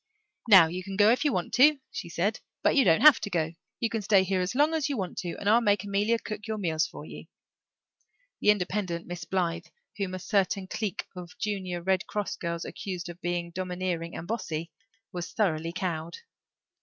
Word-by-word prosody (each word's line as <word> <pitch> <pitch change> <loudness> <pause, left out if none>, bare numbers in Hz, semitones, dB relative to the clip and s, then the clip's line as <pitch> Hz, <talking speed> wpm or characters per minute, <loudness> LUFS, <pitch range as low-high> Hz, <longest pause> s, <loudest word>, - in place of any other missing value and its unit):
"Now 190 -5 +10
you 180 +3 -5
can 195 0 -6
go 210 +1 +6
if 250 - +2
you 295 - +2
want 180 -6 -2
to," 295 +4 +6
she - - -6
said, 190 +6 -1 0.2
"but - - +3
you 275 - +6
don't 165 -4 +4
have 305 -1 +8
to 205 - -4
go. 165 -3 -1 0.3
You 230 - +1
can 225 - -1
stay 200 -2 +4
here 190 0 0
as 180 +6 -2
long 295 +4 +3
as 310 -2 0
you 280 - -2
want 190 -3 -3
to 175 -3 -4
and 200 - -5
I'll 225 +3 +5
make 205 -4 +2
Amelia 205 +3 +1
cook 215 -1 -7
your 220 0 -2
meals 165 -4 0
for - - -10
you." - - -10 1.1
The - - +2
independent 185 -3 0
Miss 175 -1 -6
Blythe, 170 -2 -1 0.3
whom 195 -2 -2
a - - -3
certain 195 0 0
clique 205 0 -3
of 180 -1 -9
Junior 185 -4 -3
Red 190 0 +1
Cross 205 -3 -3
girls 170 0 -3
accused 180 -3 -6
of 175 +1 -10
being 175 -1 -2
domineering 180 -2 -3
and 170 - -7
"bossy," 170 -7 -3 0.4
was 175 -2 -6
thoroughly 165 -6 0
cowed. 170 -2 -3
185 Hz, 205 wpm, -28 LUFS, 175-210 Hz, 1.1 s, Now